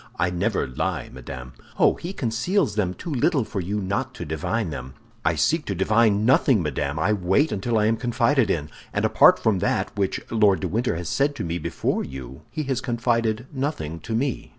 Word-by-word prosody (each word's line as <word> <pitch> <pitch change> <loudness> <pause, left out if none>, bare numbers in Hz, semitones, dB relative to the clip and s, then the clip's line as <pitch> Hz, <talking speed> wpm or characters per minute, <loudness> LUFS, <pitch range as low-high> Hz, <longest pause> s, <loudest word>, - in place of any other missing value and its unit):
"I 90 - +1
never 90 -1 0
lie, 65 - -3
madame." 65 -1 -8 0.2
"Oh, - - +5
he 175 - -6
conceals 130 - 0
them 95 -4 -1
too 170 - -6
little 140 +1 +2
for 110 -2 -4
you 100 +4 -2
not 100 0 -2
to 85 - -6
divine 80 +6 -2
them." 65 -2 -7 0.3
"I - - +2
seek 165 -1 +2
to 100 - -2
divine 105 +2 +3
nothing, 125 -4 +4
madame; 75 -1 -2
I 90 +7 +2
wait 100 - +2
till 115 +2 0
I 105 - +3
am 115 +1 +2
confided 125 +2 +2
in, 75 -2 -1 0.2
and - - +1
apart - - +6
from 105 -4 +1
that 100 - -1
which 100 -2 0
Lord 105 -6 +3
de - - -1
Winter 115 -3 0
has 85 0 -4
said 140 - +1
to - - -4
me 85 0 -2
before - - -1
you, 65 -1 -8
he 155 +6 -3
has 135 -2 -1
confided 115 -2 0
nothing 130 - -3
to 110 - -4
me." 130 +2 -1
105 Hz, 200 wpm, -24 LUFS, 85-120 Hz, 0.3 s, apart